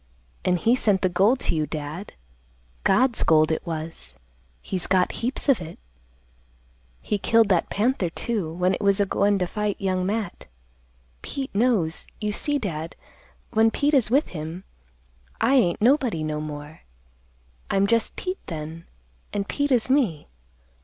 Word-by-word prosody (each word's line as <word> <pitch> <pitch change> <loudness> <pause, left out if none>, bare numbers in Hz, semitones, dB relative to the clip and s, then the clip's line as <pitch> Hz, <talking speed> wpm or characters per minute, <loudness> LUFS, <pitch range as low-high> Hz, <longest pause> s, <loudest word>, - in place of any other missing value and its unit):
An' 180 - +2
he 230 +7 +2
sent 205 -6 +1
the 185 - +3
gold 200 +9 +3
to - - +1
you, 155 -1 0
Dad; 155 +5 -6 0.7
God's 255 -2 +3
gold 155 0 +4
it 160 - -1
was; 160 0 -5 0.4
he's 185 -3 -3
got 185 -1 +2
heaps 250 +5 -2
of 265 -9 +4
it. 165 -1 -8 1.2
He 210 - -2
killed 225 +1 +3
that 180 -4 +2
panther, 210 -4 0
too, 200 -2 -3
when 180 +3 +1
it - - -3
was 200 0 +3
a 200 - +3
goin' 200 +1 +2
to 185 - 0
fight 210 +2 -2
Young 185 -2 0
Matt. 200 -1 -3 0.7
Pete 270 -1 -5
knows. 200 -7 +1
You 210 -1 -1
see, 290 +7 0
Dad, 165 - -4 0.6
when 225 0 +4
Pete 290 +6 0
is 260 -7 +4
with 275 +6 +2
him, 160 +2 -6 0.8
I 260 - +3
ain't 205 -11 +3
nobody 245 - +3
no 155 -1 -2
more. 150 0 -8 0.9
I'm 195 0 +2
just 230 +2 +1
Pete 370 0 -4
then, 160 0 -6 0.5
an' 205 - -1
Pete 285 +7 -2
is 240 -4 +4
me. 250 - +1
200 Hz, 155 wpm, -24 LUFS, 165-230 Hz, 1.2 s, gold